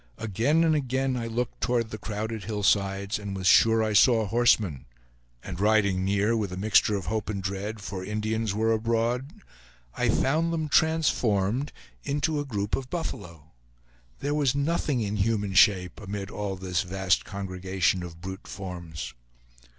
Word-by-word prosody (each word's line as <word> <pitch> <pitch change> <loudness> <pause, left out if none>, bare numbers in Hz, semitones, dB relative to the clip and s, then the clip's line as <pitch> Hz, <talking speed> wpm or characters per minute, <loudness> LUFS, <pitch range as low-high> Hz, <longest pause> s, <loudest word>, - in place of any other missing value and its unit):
Again 115 - +1
and 160 -1 +3
again 130 -2 0
I 115 -2 -3
looked 115 +1 -3
toward 115 -3 0
the 110 - -6
crowded 110 0 -4
hillsides, 100 -1 0
and 100 -2 -5
was 95 -1 -5
sure 110 +4 +5
I 110 -1 0
saw 110 +1 +5
horsemen; 105 - +2 0.6
and 90 -2 -7
riding 100 -3 +3
near, 100 +4 +1
with 105 -4 -2
a 90 - -5
mixture 105 +1 +3
of 95 -4 -4
hope 110 +6 -2
and 100 -2 -2
dread, 100 +3 -4
for 95 -2 -5
Indians 110 +2 -2
were 110 +3 +1
abroad, 115 +4 0 0.6
I - - 0
found 160 +5 +1
them 160 -2 -2
transformed 135 - +2 0.3
into 150 +2 0
a 145 - -3
group 105 -6 -2
of 130 -1 -6
buffalo. 85 - -6 0.7
There 145 +1 -1
was 145 -3 +1
nothing 145 -3 0
in 105 0 -2
human 105 -1 0
shape 95 -2 +4
amid 100 -1 -5
all 100 -2 -3
this 90 -1 -1
vast 95 0 0
congregation 95 -2 -1
of 85 -1 -9
brute 95 +1 -7
forms. 85 -8 -7
105 Hz, 160 wpm, -27 LUFS, 95-120 Hz, 0.7 s, sure